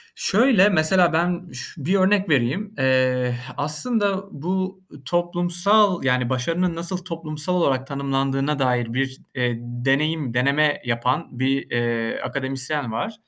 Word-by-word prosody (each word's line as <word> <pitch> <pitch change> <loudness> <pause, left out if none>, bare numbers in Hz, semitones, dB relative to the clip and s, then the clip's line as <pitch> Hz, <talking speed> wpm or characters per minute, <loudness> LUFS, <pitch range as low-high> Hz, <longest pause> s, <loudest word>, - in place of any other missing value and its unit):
Şöyle, 210 -2 +4
mesela 175 0 +3
ben 175 +2 -1
ş 125 0 -7 0.2
bir 185 +5 +2
örnek 195 0 +3
vereyim: 155 - 0
Eee, 130 -1 +2 0.2
h 130 - -10
aslında 195 - 0
bu 185 +5 -3 0.2
toplumsal, 175 +4 +2
yani, 125 -2 +1
başarının 165 +7 0
nasıl 170 +2 -2
toplumsal 165 -2 -4
olarak 135 -7 +1
tanımlandığına 135 +1 -1
dair 125 -3 0
bir 135 +1 -1 0.2
e 125 -2 0
deneyim 135 +4 -1
deneme 140 +4 +2
yapan 125 +3 -1
bir, 135 +1 0
eee, 120 -1 -1
akademisyen 135 -1 -2
var. 155 - -3
145 Hz, 125 wpm, -22 LUFS, 130-180 Hz, 0.2 s, Şöyle